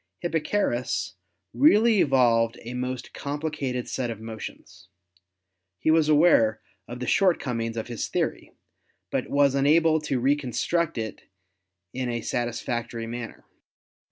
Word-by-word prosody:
Hipparchus 130 - -1 0.4
really 225 - +5
evolved 120 -4 +3
a 120 +2 -6
most 125 0 -4
complicated 145 -4 -3
set 125 -2 -2
of 115 -2 -5
motions. 110 -1 -9 0.9
He 155 - +1
was 160 -1 +3
aware 145 -8 +4 0.3
of 120 +1 -7
the 125 - -3
short 185 +2 +3
comings 115 -3 -3
of 110 - -3
his 120 -3 -4
theory, - - -2 0.6
but - - -2
was 140 -1 +3
unable 155 +3 +3
to 140 -4 -1
reconstruct 145 +4 0
it 110 -1 -6 0.6
in 130 -1 -3
a 120 -1 -2
satisfactory 120 -1 -3
manner. 115 0 -7
125 Hz, 125 wpm, -26 LUFS, 115-150 Hz, 0.9 s, really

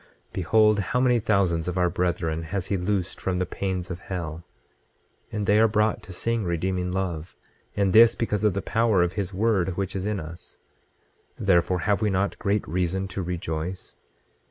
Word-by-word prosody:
26:13 - - -36
Behold, 105 +4 +3
how 100 +6 0
many 125 -2 +3
thousands 95 -6 +1
of 90 0 -2
our 90 -1 +3
brethren 85 -2 -1
has 90 +3 -3
he 100 - -1
loosed 95 0 -2
from 95 -1 -1
the 90 - 0
pains 95 0 -3
of 90 - -5
hell; 85 -3 -5 0.9
and 105 -1 -2
they 105 +1 +4
are 115 - +6
brought 105 0 +1
to 95 - -12
sing 115 +5 -1
redeeming 90 +1 -1
love, 90 -4 -3 0.4
and 100 -2 +1
this 115 +1 +7
because 105 -3 -1
of 105 -4 +2
the 100 - -2
power 110 -5 +2
of 90 +1 -1
his 100 -2 -3
word 95 -3 +1
which 100 -1 -3
is 95 +1 -2
in 105 -2 -1
us, 85 +1 -10 0.8
therefore 90 -1 +2
have 105 +3 +1
we 105 - +2
not 95 +1 -1
great 100 +1 0
reason 90 +3 -1
to 95 +1 -4
rejoice? 85 0 -4
95 Hz, 185 wpm, -25 LUFS, 90-105 Hz, 0.9 s, this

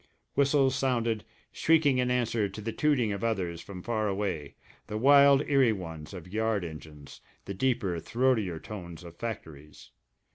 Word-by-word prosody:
Whistles 140 -1 +3
sounded, 120 -5 0 0.3
shrieking 155 -5 +3
in 125 0 +1
answer 115 -4 0
to 95 - -9
the 110 +2 -4
tooting 130 -5 +1
of 100 +1 -4
others 90 -7 -1
from 90 -2 -9
far 110 -3 -1
away, 95 -8 -3 0.3
the 105 -1 -4
wild 140 +3 +6
eerie 135 -5 +4
ones 80 -6 -7
of 90 -3 -9
yard 110 -3 0
engines, 75 -3 -10 0.2
the 100 - -5
deeper, 100 -5 0
throatier 110 -3 0
tones 85 -5 -9
of 85 -1 -11
factories. 80 - -8
110 Hz, 150 wpm, -29 LUFS, 90-125 Hz, 0.3 s, wild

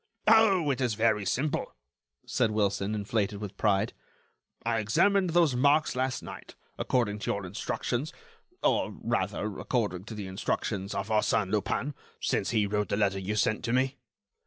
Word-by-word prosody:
"Oh! 200 -8 +5
it 135 - -2
is 120 -4 +1
very 110 -3 +2
simple," 140 +9 -1 0.5
said 125 -3 +1
Wilson, 105 -1 0
inflated 105 -1 -1
with 100 -1 -6
pride; 105 +1 +1 0.7
"I 115 -1 +1
examined 185 - +3
those 165 -5 +3
marks 145 +4 +3
last 130 0 -1
night, - - -10 0.2
according 110 -5 0
to 115 - -1
your 100 -1 -3
instructions, 120 - -3 0.5
or, - - +2
rather, 105 -2 -1
according 100 -7 -1
to 115 - -7
the 105 -2 -5
instructions 95 +1 -2
of 100 +2 -3
Arsène 105 -2 +2
Lupin, 115 +7 -1 0.3
since - - 0
he 110 -2 +2
wrote 105 +1 -1
the 100 - 0
letter 100 -2 +1
you 100 +3 -3
sent 110 0 +1
to 115 - -1
me." 130 +2 +1
110 Hz, 160 wpm, -29 LUFS, 100-130 Hz, 0.7 s, Oh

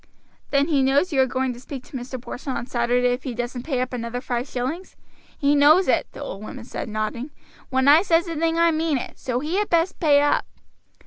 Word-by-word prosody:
"Then 280 +1 +2
he 285 -4 +3
knows 280 +6 +2
you 270 - +4
are 260 - +3
going 260 0 -1
to 240 - -11
speak 265 0 -8
to - - -20
Mr. 255 +1 -5
Porson 255 +2 -5
on 235 - -4
Saturday 245 0 +1
if 250 - -4
he 255 -4 -5
doesn't 240 +1 -4
pay 260 -2 -2
up 255 0 -3
another 235 0 -3
five 245 0 -3
shillings?" 270 +10 -4 0.4
"He 285 -1 +2
knows 305 +6 +5
it," - - +2
the - - -7
old 195 - -7
woman 235 +2 -8
said, 235 - -6
nodding. 215 +5 -3 0.4
"When 260 0 +1
I 300 +3 +8
says 340 -2 +2
a 335 - -4
thing 325 +1 0
I 335 0 +4
mean 315 -2 0
it. - - -7
So 250 -1 -2
he 315 +6 -2
had 415 0 0
best 340 +2 +1
pay 295 -4 +5
up." 290 - +1
265 Hz, 235 wpm, -23 LUFS, 245-310 Hz, 0.4 s, I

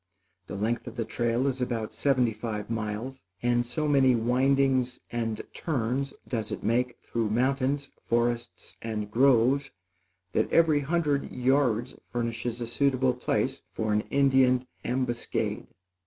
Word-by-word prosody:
The - - -6
length 115 +5 -1
of 120 - -7
the 115 -3 -2
trail 120 +3 0
is 135 -2 -1
about 115 -3 -2
seventy 125 -5 +2
five 110 0 -5
miles, 115 +4 -3 0.2
and 120 0 +3
so 150 +6 -2
many 135 -3 +5
windings 130 +1 +2
and 115 -2 -2
turns 135 -2 -1 0.2
does 110 -4 -3
it - - -5
make 125 +2 +1
through 115 -2 -1
mountains, 135 +4 0
forests 120 0 -1
and 105 -2 -4
gorges, 135 +3 +4 0.6
that - - 0
every 160 -3 +5
hundred 145 -1 0
yards 125 -2 +1
furnishes 120 0 -3
a - - -1
suitable 130 +1 +2
place 125 - -1
for 110 -1 -1
an 105 - +3
Indian 130 -2 +4 0.2
ambuscade. 125 -1 -2
125 Hz, 135 wpm, -28 LUFS, 115-135 Hz, 0.6 s, many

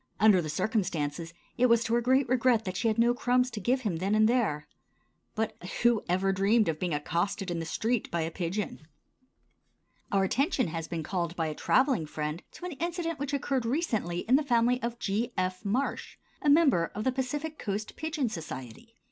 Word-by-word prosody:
Under 205 -3 +6
the 155 - -5
circumstances, 165 -3 -1 0.3
it 250 - +5
was 235 -1 +4
to 230 - -2
her 240 - +3
great 260 +2 +3
regret 245 -2 +2
that 185 -1 -4
she 190 - 0
had 220 0 +1
no 235 +1 +4
crumbs 250 +1 +1
to 225 - -5
give 250 +6 +1
him 205 -9 -1
then 195 +5 0
and 215 0 +5
there. 220 -12 0 0.7
But 220 -1 -1 0.3
who 235 -2 +4
ever 190 +2 +2
dreamed 205 +3 +3
of 160 -1 -1
being 180 -2 -1
accosted 175 +6 -2
in 170 - -2
the 165 - -4
street 230 +5 -1
by 170 - -1
a 160 +1 -2
pigeon? 175 -2 -4 1.2
Our 195 -1 +3
attention 260 - +1
has 165 0 -4
been 165 -2 -4
called 170 0 -2
by 165 - -1
a - - -3
traveling 255 - +2
friend 150 +2 -4
to 360 - -9
an 360 - -4
incident 330 0 -3
which 285 0 -3
occurred 275 -2 0
recently 230 - -1
in 255 +4 +4
the 305 - 0
family 245 -1 +2
of 235 0 -3
G. 225 +3 -2
F. 185 +1 -1
Marsh, 235 +7 -2 0.2
a 295 - +2
member 285 - +4
of 210 - -3
the 260 - +2
Pacific 295 +5 -3
Coast 205 +1 -4
Pigeon 310 -4 -2
Society. 165 - -8
220 Hz, 200 wpm, -29 LUFS, 175-255 Hz, 1.2 s, Under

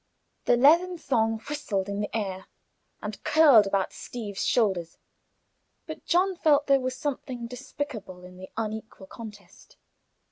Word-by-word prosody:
The 245 - +4
leathern 340 +7 +5
thong 225 -7 +1
whistled 240 -10 -2
in 200 0 -3
the 210 +2 -2
air, 190 -3 -4 0.6
and - - -6
curled 280 -10 +6
about 195 -1 0
Steeve's 210 -5 -6
shoulders; 190 -8 +1 0.9
but - - -8
John 370 +2 +2
felt 295 -4 +3
there 275 -1 +4
was 255 0 -3
something 260 -4 -4
despicable 235 -7 -7
in 180 0 -13
the 185 0 -10
unequal 220 -2 -5
contest. 205 -3 -12
230 Hz, 135 wpm, -27 LUFS, 200-285 Hz, 0.9 s, curled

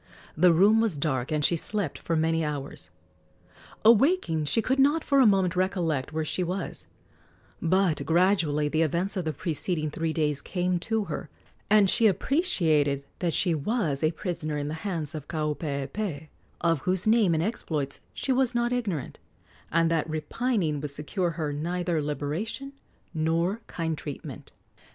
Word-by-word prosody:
The 180 +2 +5
room 205 +7 +5
was 215 -9 0
dark, 135 -3 -1
and 150 -1 +1
she 170 - +3
slept 195 -1 -2
for 165 - -2
many 160 +1 +1
hours. 145 -2 -5 1.0
Awaking, 225 - +4
she 145 +10 +1
could 260 +5 0
not 290 +4 +4
for 275 - +3
a 255 - +7
moment 190 -4 +3
recollect 170 -7 0
where 160 0 -2
she 180 - -1
was; 180 +1 -4 0.7
but 170 -4 +2
gradually 165 -2 +2
the 155 +2 0
events 170 +6 0
of 185 -3 -2
the 155 - 0
preceding 155 -1 -2
three 160 +1 -2
days 150 -3 0
came 180 -1 -1
to 220 +3 -1
her, - - -5 0.4
and 210 -2 +6
she 225 +4 +5
appreciated 160 - +2
that 170 -3 0
she 180 -4 +2
was 160 - -1
a 155 - +4
prisoner 160 -3 -4
in 145 0 -3
the - - -3
hands 165 -7 -3
of 150 -3 -7
Kaupeepee, 150 +1 -3 0.3
of 165 -2 +2
whose 185 +5 -1
name 215 -6 +4
and 160 - +1
exploits 155 -10 -2
she 270 - -2
was 255 -1 +2
not 240 +1 +1
ignorant, 200 - -3 0.5
and 165 0 +2
that 165 -1 0
repining 160 - -1
would 150 - -4
secure 155 +6 -2
her 150 -3 -2
neither 170 +2 -1
liberation 155 - -4 0.4
nor 165 +6 0
kind 165 -2 -2
treatment. 145 -3 -8
165 Hz, 160 wpm, -27 LUFS, 150-200 Hz, 1.0 s, a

